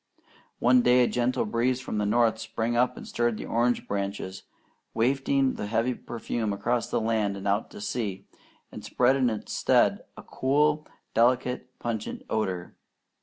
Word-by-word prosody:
One 125 +1 +5
day 125 +1 +5
a - - +3
gentle 125 0 0
breeze 120 +4 0
from 115 -4 -4
the 105 - 0
north 115 +1 +2
sprang 110 +1 -2
up 125 +1 +2
and - - -9
stirred 120 -2 0
the - - -6
orange 120 +1 0
branches, 100 -1 -3 0.5
wafting 135 +3 +2
the 105 - -5
heavy 115 +4 +1
perfume 115 -2 -4
across 120 +4 -1
the - - 0
land 110 -3 0
and 100 +1 -5
out 100 +2 0
to 210 - -10
sea, 115 - -3 0.5
and - - -9
spread 125 +2 +2
in 130 -3 +2
its 110 -2 -5
stead - - +3
a - - -9
cool, 150 +3 +1 0.3
delicate, 125 +2 +2
pungent 110 -3 -4
odour. 95 -5 -2
120 Hz, 165 wpm, -27 LUFS, 110-125 Hz, 0.5 s, One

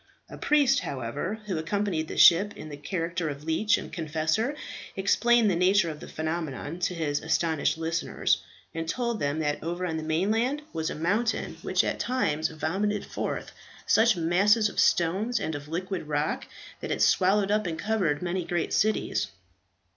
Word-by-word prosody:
A - - -7
priest, 285 -2 +3
however, 140 - -4
who 185 -6 -2
accompanied 170 -1 -1
the - - -6
ship 195 +4 +6
in 155 - -8
the 145 - -6
character 165 +2 -3
of 140 0 -7
leech 210 +8 +2
and - - -8
confessor, 160 - -1 0.4
explained 225 +3 +3
the - - +1
nature 180 0 +3
of 150 - -9
the - - -9
phenomenon 160 0 -4
to 180 0 -1
his 150 -3 -1
astonished 160 -1 +1
listeners, 165 0 0 0.3
and 165 0 -4
told 235 +1 -1
them 145 +1 -1
that 145 -1 -1
over 175 +2 -3
on 160 -2 -2
the - - -3
mainland 220 - 0
was 160 -1 -2
a - - -4
mountain 205 +9 -1
which - - +1
at - - -2
times 160 -12 0
vomited 190 +7 -1
forth - - -4 0.3
such 225 -3 +4
masses 200 +6 +3
of - - -5
stones 195 +8 +2
and 160 - -3
of 145 0 -6
liquid 180 +1 -4
rock 150 0 -1 0.3
that - - -6
it - - +1
had - - -5
swallowed 195 +2 +3
up 210 -2 +1
and 165 -2 -3
covered 185 -8 0
many 180 +1 -1
great 175 0 -2
cities. 215 +1 +1
175 Hz, 175 wpm, -27 LUFS, 160-210 Hz, 0.4 s, ship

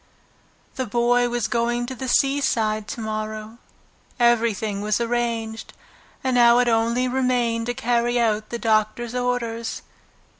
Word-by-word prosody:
The 260 -2 -2
Boy 240 +2 +2
was 240 -2 -1
going 240 +1 0
to 260 - -6
the 260 +1 -6
seaside 230 -6 +1
to 230 - -6
morrow. 215 +1 -5 0.6
Everything 225 -4 +1
was 210 +1 0
arranged, 230 -2 -2 0.5
and 260 -1 0
now 240 -1 +6
it 245 0 +3
only 235 +2 +1
remained 245 -3 0
to 245 - -2
carry 240 +1 +1
out 215 -2 0
the 235 - -3
doctor's 225 +1 0
orders. 245 -2 -2
235 Hz, 135 wpm, -23 LUFS, 220-245 Hz, 0.6 s, now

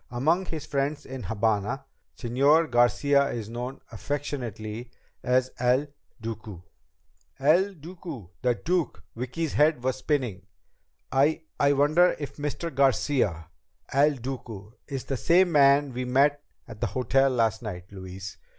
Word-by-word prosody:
"Among 160 +10 +1
his 160 -3 -5
friends 140 +1 -2
in 130 -1 -7
Habana, 110 +5 -1 0.3
Señor 140 +7 +3
Garcia 140 +4 +3
is 110 -5 -5
known 125 +3 -5
affectionately 120 -6 -4 0.3
as 130 +1 +1
El 125 +3 +3 0.3
Duque." 110 -5 -7 0.8
El 175 +8 +3
Duque! 160 - -9
The 125 -1 +2
Duke! 175 +4 -1
Vicki's 130 +6 -3
head 150 -4 +3
was 130 0 0
spinning. 125 -10 -2 0.6
"I 145 +5 +2 0.2
I 140 0 +4
wonder 155 +6 +4
if 145 - -7
Mr. 150 +2 -4
Garcia 125 - +1 0.4
El 145 +2 +4
Duque 115 -4 -7
is 135 -3 -4
the 135 - -3
same 175 - +4
man 140 -2 +5
we 125 +1 -3
met 140 +3 +3 0.3
at 105 - -11
the - - +1
hotel 135 +2 +2
last 115 -3 +1
night, 90 -6 -6
Louise. 95 0 -8
135 Hz, 130 wpm, -27 LUFS, 115-145 Hz, 0.8 s, man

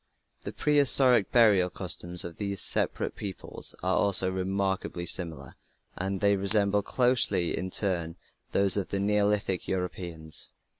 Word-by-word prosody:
The - - -5
prehistoric 135 -6 +2
burial 105 -7 +3
customs 90 -1 0
of 85 -2 -10
these 100 -2 -4
separate - - +4
peoples 100 -3 -4
are 95 0 -1
also 95 -2 +2
remarkably 95 -1 -4
similar 85 -2 -2 0.4
and 95 +1 -5
they 100 0 +2
resemble 100 +1 +3
closely 120 -6 0
in 95 - -5
turn 85 -4 -3 0.4
those 100 0 +3
of 100 - -3
the 100 - -4
Neolithic 100 -2 -1
Europeans. 85 -4 -6
95 Hz, 130 wpm, -26 LUFS, 90-105 Hz, 0.4 s, separate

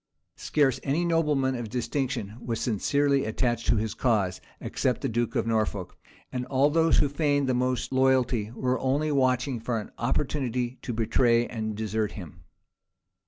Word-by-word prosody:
Scarce 145 -4 +1
any 150 +5 0
nobleman 150 -6 +2
of 120 -3 -4
distinction 125 -3 -2
was 115 -2 -2
sincerely 140 +5 +1
attached 120 +1 -1
to 115 - +4
his 110 -1 -1
cause, 100 -7 0 0.2
except - - -1
the - - 0
duke 120 +1 -1
of - - +1
Norfolk; 110 -4 -1 0.4
and 125 -1 -2
all 140 +2 +3
those 165 0 +3
who 145 - +4
feigned 145 -1 +1
the 130 - +2
most 125 +1 -1
loyalty 130 -4 +2
were 130 +1 0
only 145 +4 0
watching 130 -2 +1
for 115 0 -2
an 105 - -9
opportunity 125 -1 -1
to - - -4
betray 115 +1 +2
and 110 -3 -4
desert 110 -1 -1
him. 85 -4 -10
125 Hz, 160 wpm, -27 LUFS, 110-135 Hz, 0.4 s, to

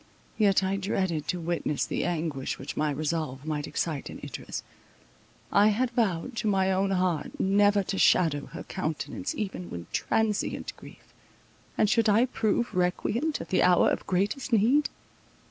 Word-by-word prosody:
Yet 200 -3 +3
I 190 +1 0
dreaded 185 -5 -1
to 180 - -1
witness 165 -3 -1
the - - -2
anguish 155 -6 -2
which 135 - -7
my 155 0 +1
resolve 150 -2 -2
might 150 -1 -2
excite 155 -5 -3
in - - -8
Idris. - - -6 0.9
I 205 +1 +5
had 235 +4 +1
vowed 225 0 0
to 220 - -1
my 190 -2 +2
own 190 +1 +1
heart 180 -5 -1
never 205 +1 +3
to 195 +1 -3
shadow 150 -5 +3
her - - -8
countenance 270 - -4
even 195 -6 -4
with 85 -1 -8
transient 220 -2 -1
grief, - - -15 0.6
and 215 - +4
should 225 +1 +3
I 220 +4 +5
prove 235 -2 0
recreant 210 - 0
at 165 - -8
the 185 - +2
hour 180 -1 +5
of - - -3
greatest 200 +9 -1
need? 240 +7 +4
190 Hz, 160 wpm, -28 LUFS, 165-215 Hz, 0.9 s, I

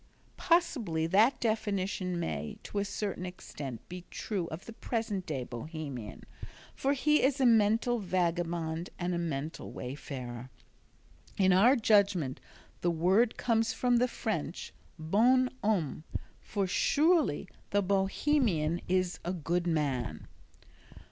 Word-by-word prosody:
Possibly 235 - +1
that 210 +10 +4
definition 200 -5 -1
may, 75 - -3
to 205 - -3
a 200 - 0
certain 200 -2 -3
extent, 145 -9 -7
be 180 0 -8
true 190 -6 -3
of 160 +3 -7
the 230 - -9
present 220 -5 -3
day 140 -5 -2
Bohemian, 130 -2 -7 0.5
for 275 +1 0
he 300 +2 +3
is 275 +1 +2
a 265 - +3
mental 230 +1 +4
vagabond 170 -3 -1
and 175 0 -1
a 170 - -1
mental 155 -2 -4
wayfarer. 125 -2 -6 0.9
In 190 -1 +4
our 230 +9 +6
judgment 200 - +3 0.4
the 175 - +2
word 185 +8 +3
comes 225 -2 +1
from 245 -1 +2
the 250 +1 +3
French 205 -8 -4 0.2
"Bon 235 +11 +3
Homme," 175 -8 0 0.4
for 200 -2 -2
surely 295 - +2 0.2
the 205 0 +2
Bohemian 195 - +1
is 185 -1 0
a 175 - -2
"good 175 +1 -1
man." 140 -8 -1
185 Hz, 125 wpm, -31 LUFS, 160-225 Hz, 0.9 s, our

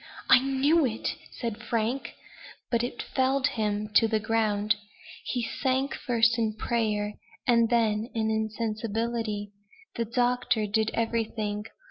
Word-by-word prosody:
"I - - +9
knew 275 +5 +3
it," 230 -4 -1 0.2
said 230 -3 -5
Frank. 235 +3 -2 0.6
But 235 -1 +2
it 240 0 -3
felled 265 0 +1
him 210 -1 -1
to 225 +2 +6
the 220 -1 +1
ground. 215 -1 +1 0.5
He 245 -2 -1
sank 265 +3 0
first 235 -1 +2
in 220 -2 0
prayer, 210 -2 0 0.3
and 235 -2 +4
then 225 -1 +2
in 220 -1 +1
insensibility. 220 -1 -2 0.5
The 230 - 0
doctor 245 -2 +1
did 220 +1 +1
everything. 220 -2 -1
225 Hz, 125 wpm, -28 LUFS, 215-240 Hz, 0.6 s, I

